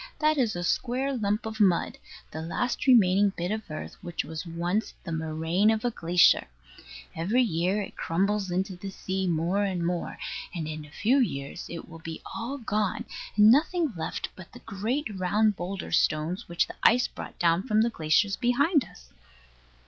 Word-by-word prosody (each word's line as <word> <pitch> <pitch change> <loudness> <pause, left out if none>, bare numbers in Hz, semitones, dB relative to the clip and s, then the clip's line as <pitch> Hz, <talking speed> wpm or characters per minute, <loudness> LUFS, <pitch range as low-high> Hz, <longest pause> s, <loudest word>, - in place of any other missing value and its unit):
That 310 0 +3
is 230 -6 +1
a 175 - -3
square 260 +8 0
lump 210 -1 -1
of 220 0 -5
mud, 190 -5 +2 0.3
the 160 - -5
last 240 +12 -2
remaining 200 -5 +5
bit 175 +3 -2
of 215 -3 -4
earth 155 0 -7
which 175 -4 -3
was 160 +3 -6
once 175 +6 -2
the 170 - -6
moraine 160 +5 +1
of 220 +1 +1
a 240 - +2
glacier. 175 - +4 0.7
Every 205 +11 +2
year 185 0 0
it - - -10
crumbles 195 +3 0
into 185 +2 -1
the 195 +2 -7
sea 190 0 -3
more 175 +4 +1
and 185 -4 -1
more; 175 0 -2 0.4
and 160 -3 -3
in 155 -1 -6
a - - -15
few 245 - +2
years 140 - -2
it 170 - -7
will 165 -1 -11
be 160 0 -7 0.2
all 245 +5 -4
gone, 215 -5 -1 0.3
and 210 +1 +7
nothing 310 +1 +2
left 165 0 -4
but 185 -2 -12
the 245 - -11
great 225 +8 -2
round 210 +3 +2
boulder 185 +2 -5
stones 160 +5 0
which 170 - +2
the - - -11
ice 245 +1 +5
brought - - -9
down 170 +1 +3
from 215 -1 +2
the 235 - 0
glaciers 165 +4 +2
behind 285 +5 +2
us. - - -16
190 Hz, 180 wpm, -27 LUFS, 170-220 Hz, 0.7 s, and